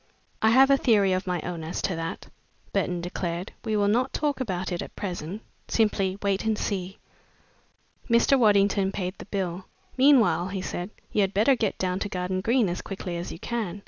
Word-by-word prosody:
"I 220 Hz, -, +5 dB
have 265 Hz, +4 st, +6 dB
a 275 Hz, -, +6 dB
theory 205 Hz, -7 st, +3 dB
of 185 Hz, +1 st, -2 dB
my 180 Hz, -1 st, 0 dB
own 175 Hz, -2 st, -5 dB
as 160 Hz, -, -4 dB
to 185 Hz, -, 0 dB
that," 165 Hz, +1 st, -5 dB, 0.5 s
Burton 175 Hz, -1 st, 0 dB
declared. 175 Hz, 0 st, -4 dB
"We 220 Hz, -2 st, -1 dB
will 205 Hz, -1 st, +2 dB
not 245 Hz, +6 st, +2 dB
talk 290 Hz, -2 st, -1 dB
about 190 Hz, -7 st, -3 dB
it 175 Hz, -, -2 dB
at -, -, -8 dB
present 185 Hz, +1 st, -5 dB, 0.2 s
simply 195 Hz, -4 st, +1 dB
wait 200 Hz, -1 st, +1 dB
and 220 Hz, -1 st, 0 dB
see." 190 Hz, -2 st, -3 dB, 1.1 s
Mr. 235 Hz, +4 st, +5 dB
Waddington 200 Hz, -3 st, +3 dB
paid 185 Hz, -2 st, -3 dB
the -, -, -8 dB
bill. 185 Hz, -2 st, -3 dB, 0.3 s
"Meanwhile," 245 Hz, -, +5 dB
he 190 Hz, 0 st, -4 dB
said, 180 Hz, 0 st, -4 dB, 0.2 s
"you 210 Hz, -, +2 dB
had 195 Hz, 0 st, 0 dB
better 225 Hz, +7 st, +4 dB
get 220 Hz, -5 st, -1 dB
down 185 Hz, 0 st, -1 dB
to 205 Hz, -, -3 dB
Garden 185 Hz, 0 st, -2 dB
Green 230 Hz, +1 st, +2 dB
as 175 Hz, 0 st, -3 dB
quickly 185 Hz, -3 st, -5 dB
as 170 Hz, +1 st, -5 dB
you -, -, -7 dB
can. 205 Hz, -2 st, -3 dB
195 Hz, 195 wpm, -26 LUFS, 180-220 Hz, 1.1 s, have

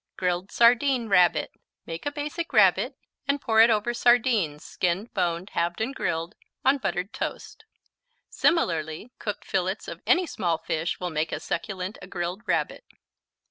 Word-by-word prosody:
Grilled 180 Hz, +1 st, -1 dB
Sardine 240 Hz, 0 st, +4 dB
Rabbit 180 Hz, -3 st, +4 dB, 0.3 s
Make 165 Hz, -, -5 dB
a -, -, 0 dB
Basic 300 Hz, +3 st, -4 dB
Rabbit -, -, +4 dB, 0.3 s
and 280 Hz, 0 st, +1 dB
pour 220 Hz, -4 st, +4 dB
it 230 Hz, -, +7 dB
over 220 Hz, +2 st, +1 dB
sardines, 235 Hz, -, +2 dB
skinned, 185 Hz, +5 st, -2 dB
boned, 175 Hz, 0 st, -1 dB
halved 170 Hz, 0 st, -1 dB
and 230 Hz, +5 st, -1 dB
grilled, 165 Hz, -6 st, -2 dB, 0.3 s
on 275 Hz, +2 st, +4 dB
buttered 195 Hz, 0 st, -2 dB
toast. 265 Hz, -, -6 dB, 0.6 s
Similarly 165 Hz, -, 0 dB
cooked 210 Hz, -2 st, -5 dB
fillets 190 Hz, +2 st, -2 dB
of -, -, -7 dB
any 365 Hz, 0 st, +4 dB
small 175 Hz, -, -1 dB
fish 165 Hz, +1 st, -2 dB
will 180 Hz, -1 st, -3 dB
make 155 Hz, 0 st, -1 dB
as -, -, -4 dB
succulent 185 Hz, +3 st, -4 dB
a -, -, -9 dB
grilled 175 Hz, +2 st, -4 dB
Rabbit. -, -, -1 dB
195 Hz, 150 wpm, -26 LUFS, 175-240 Hz, 0.6 s, it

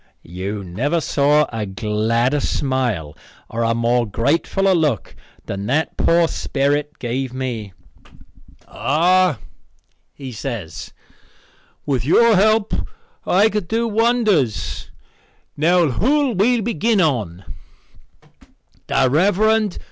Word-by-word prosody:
You 95 Hz, +4 st, -5 dB
never 130 Hz, -, -1 dB
saw 150 Hz, 0 st, +2 dB
a 110 Hz, -2 st, -3 dB
gladder 110 Hz, +7 st, 0 dB
smile 125 Hz, -, -2 dB, 0.4 s
or 115 Hz, -, -3 dB
a 115 Hz, 0 st, +1 dB
more 120 Hz, 0 st, +1 dB
gratefuller 165 Hz, -, +1 dB
look 150 Hz, -, -1 dB, 0.3 s
than 100 Hz, +1 st, -5 dB
that 155 Hz, +5 st, 0 dB
poor 170 Hz, 0 st, +3 dB
sperrit 145 Hz, +1 st, -1 dB
gave 130 Hz, +1 st, -4 dB
me. 115 Hz, -7 st, -4 dB, 0.9 s
"Ah," 165 Hz, -, +2 dB, 0.8 s
he 135 Hz, -2 st, -8 dB
says, 110 Hz, -, -6 dB, 0.9 s
"with 135 Hz, -5 st, -1 dB
your 225 Hz, -, +4 dB
help 215 Hz, +2 st, +2 dB, 0.5 s
I 200 Hz, +4 st, +4 dB
could 210 Hz, -4 st, -3 dB
do 230 Hz, +4 st, 0 dB
wonders. 215 Hz, -, 0 dB, 0.7 s
Now 170 Hz, +1 st, +3 dB
who'll 270 Hz, -, +1 dB
we 225 Hz, +5 st, +2 dB
begin 225 Hz, 0 st, 0 dB
on?" 110 Hz, -, -1 dB, 1.4 s
"The 135 Hz, -1 st, +2 dB
Rev. 175 Hz, +9 st, +2 dB
Mr. 215 Hz, -2 st, +2 dB
145 Hz, 105 wpm, -20 LUFS, 115-195 Hz, 1.4 s, your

